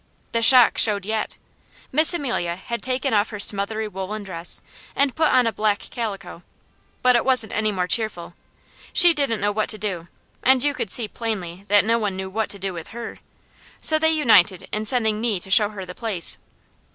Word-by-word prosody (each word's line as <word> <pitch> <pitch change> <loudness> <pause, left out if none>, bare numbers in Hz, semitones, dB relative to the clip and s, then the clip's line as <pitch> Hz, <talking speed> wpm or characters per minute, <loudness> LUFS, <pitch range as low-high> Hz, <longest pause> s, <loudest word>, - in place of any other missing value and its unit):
The 230 - -1
shock 245 +1 +7
showed 205 -3 +4
yet! 220 +1 -3 0.5
Miss 310 +4 +4
Amelia 245 - -2
had 235 +6 -6
taken 260 0 -2
off 205 0 +1
her 210 - -8
smothery 210 +2 +1
woollen 200 +2 -6
dress 175 -3 -4 0.4
and 280 -2 +1
put 315 -1 +2
on 255 -1 +3
a 225 - -1
black 210 -1 0
calico, 195 -7 -6 0.6
but 250 0 +4
it 240 - +2
wasn't 255 -4 0
any 215 0 0
more 185 -3 -2
cheerful. 195 -5 -2 0.6
She 350 -2 +7
didn't 275 -8 -2
know 205 +1 0
what 215 +1 -2
to 215 - +2
do, 185 -6 -5 0.3
and 260 0 +3
you 290 0 +1
could 220 - -5
see 225 +3 +1
plainly 200 -5 -6
that 205 0 +3
no 230 +1 +1
one 205 -4 -3
knew 190 0 -6
what 220 +2 -2
to 200 - -2
do 195 -1 -5
with 165 -2 -8
her, 235 0 -9 0.6
so 310 0 +4
they 320 0 +2
united 215 - +3
in 215 +1 -3
sending 220 -3 +1
me 225 -5 -1
to 190 - -8
show 210 0 +5
her 200 -3 -8
the 180 - -9
place. 200 -6 -2
215 Hz, 200 wpm, -21 LUFS, 195-240 Hz, 0.6 s, shock